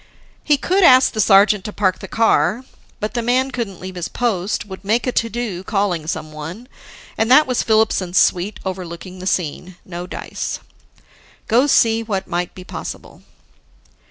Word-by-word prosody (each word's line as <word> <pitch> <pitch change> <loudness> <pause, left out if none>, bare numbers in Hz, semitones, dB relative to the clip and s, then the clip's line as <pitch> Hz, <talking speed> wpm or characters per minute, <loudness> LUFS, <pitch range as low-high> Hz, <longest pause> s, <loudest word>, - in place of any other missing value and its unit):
He 295 -2 +3
could 375 +7 +1
ask 255 -4 +7
the 215 - +1
sergeant 200 0 +5
to 210 - -4
park 190 -3 0
the - - -8
car. 225 +1 +2 0.3
But 210 - -3
the 240 - -1
man 255 +3 +1
couldn't 225 -7 -4
leave 185 0 -7
his 175 -2 -4
post, 210 -5 -1
would 190 -1 -10
make 220 +4 +1
a 250 - 0
to 230 -1 0
do 225 -6 -4
calling 190 -6 -1
someone 160 +8 -6 0.5
and 220 +1 +2
that 280 +4 +7
was 255 -2 0
Filipson's 215 -5 +1
suite 185 +4 +2
overlooking 185 0 -6
the 185 - -5
scene. 180 0 -2
No 175 0 -7
dice. - - -5 0.9
Go 245 +5 +3
see 225 -5 +3
what 205 -4 -3
might 175 0 -3
be 185 - -9
possible. - - -8
205 Hz, 165 wpm, -19 LUFS, 185-235 Hz, 0.9 s, ask